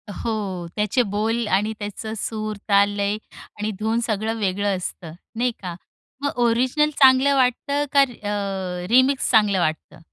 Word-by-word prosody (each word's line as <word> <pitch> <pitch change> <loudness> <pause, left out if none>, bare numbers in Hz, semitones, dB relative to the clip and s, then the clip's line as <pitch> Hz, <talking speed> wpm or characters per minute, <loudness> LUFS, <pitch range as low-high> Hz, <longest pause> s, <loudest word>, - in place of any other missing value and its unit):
हो, 195 -6 -3
त्याचे 210 +4 +1
बोल 220 +3 -1
आणि 210 +3 +1
त्याचं 210 +1 -5
सूर, 215 0 -3
ताल, 200 0 +5
लय 205 +1 0 0.4
आणि 210 +1 -1
धून 220 +2 0
सगळं 220 +1 -1
वेगळं 200 0 0
असतं. 175 -2 -6 0.2
नाही 245 +2 +1
का? 180 -2 -5 0.5
मग 285 -3 -2
ओरिजिनल 255 +6 +2
चांगलं 265 +1 +6
वाटतं 275 +3 +1
का 280 - +7
री 245 - -12
अ, 195 -3 -3
रीमिक्स 260 +3 +3
चांगलं 210 -4 +4
वाटतं? 155 -2 -2
215 Hz, 150 wpm, -22 LUFS, 200-245 Hz, 0.5 s, का